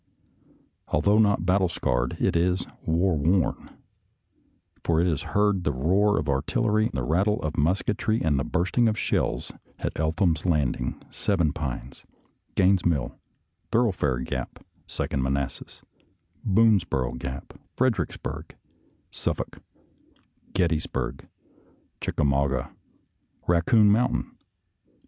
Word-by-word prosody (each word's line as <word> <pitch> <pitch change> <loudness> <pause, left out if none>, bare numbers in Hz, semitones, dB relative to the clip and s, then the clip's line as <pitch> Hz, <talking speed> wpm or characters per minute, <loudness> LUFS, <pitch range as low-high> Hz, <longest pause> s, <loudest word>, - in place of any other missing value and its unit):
Although 100 +9 +3
not 100 -5 +3
battle 95 0 +3
scarred, 60 -5 -1
it - - +1
is 90 +2 +1 0.2
war 85 +2 +2
worn, 80 +4 +1 1.1
for 80 -1 +2
it 85 - +3
has 80 -4 0 0.2
heard 105 -3 +2
the 75 - +1
roar 95 +10 +2
of - - -1
artillery, 105 +10 +1
the 65 -1 -2
rattle 95 - +1
of 75 0 -2
musketry, 100 +7 +1
and 75 -4 +1
the - - 0
bursting 90 +9 +1
of 110 0 +1
shells - - -1 0.3
at - - -3
Eltham's 80 0 +1
Landing, 75 -8 0
Seven 85 -8 0
Pines, 65 -4 -5 0.5
Gaines' 95 -1 +4
Mill, 75 -8 0 0.6
Thorough 115 -1 +3
fare 75 -8 0
Gap, - - -5 0.2
Second 65 - -2
Manassas, 70 0 -3 0.6
Boonesboro 95 - +2
Gap, 65 +2 -6 0.2
Fredericksburg, 115 -10 -2 0.6
Suffolk, - - -3 0.9
Gettysburg, 85 -5 -1 0.7
Chicka - - -1
mauga. 70 -1 +1 0.7
Raccoon 105 +5 +4
Mountain 115 +4 +1
85 Hz, 110 wpm, -26 LUFS, 70-100 Hz, 1.1 s, Gaines